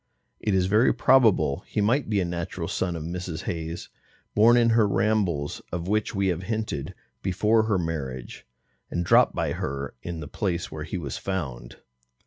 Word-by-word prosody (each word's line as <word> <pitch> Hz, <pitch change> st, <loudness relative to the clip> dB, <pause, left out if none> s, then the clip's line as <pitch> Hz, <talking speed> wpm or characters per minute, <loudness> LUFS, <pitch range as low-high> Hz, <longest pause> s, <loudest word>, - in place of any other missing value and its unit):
It 105 Hz, -, 0 dB
is 95 Hz, -1 st, +3 dB
very 105 Hz, +6 st, +4 dB
probable 110 Hz, -, +4 dB
he -, -, -2 dB
might 115 Hz, +5 st, +2 dB
be 105 Hz, -2 st, +2 dB
a 90 Hz, -, +1 dB
natural 85 Hz, -1 st, -4 dB
son 90 Hz, -2 st, -1 dB
of 80 Hz, -, -5 dB
Mrs. 85 Hz, 0 st, -5 dB
Hayes's, 80 Hz, 0 st, -4 dB, 0.4 s
born 115 Hz, +3 st, +6 dB
in 120 Hz, -1 st, +4 dB
her 115 Hz, -2 st, +4 dB
rambles 95 Hz, -7 st, 0 dB
(of 85 Hz, 0 st, -3 dB
which 105 Hz, +1 st, 0 dB
we 100 Hz, -1 st, +2 dB
have 90 Hz, -1 st, -1 dB
hinted) 110 Hz, -8 st, -3 dB, 0.3 s
before 105 Hz, +4 st, +2 dB
her 105 Hz, -3 st, +2 dB
marriage, 70 Hz, -9 st, -5 dB, 0.4 s
and 85 Hz, 0 st, -2 dB
dropped -, -, +5 dB
by -, -, 0 dB
her 70 Hz, +1 st, -4 dB
in 85 Hz, -2 st, -5 dB
the 75 Hz, -, -6 dB
place 90 Hz, +2 st, -2 dB
where 75 Hz, -1 st, -5 dB
he -, -, -4 dB
was 70 Hz, -7 st, -5 dB
found. 70 Hz, -11 st, -4 dB
90 Hz, 175 wpm, -26 LUFS, 80-105 Hz, 0.4 s, born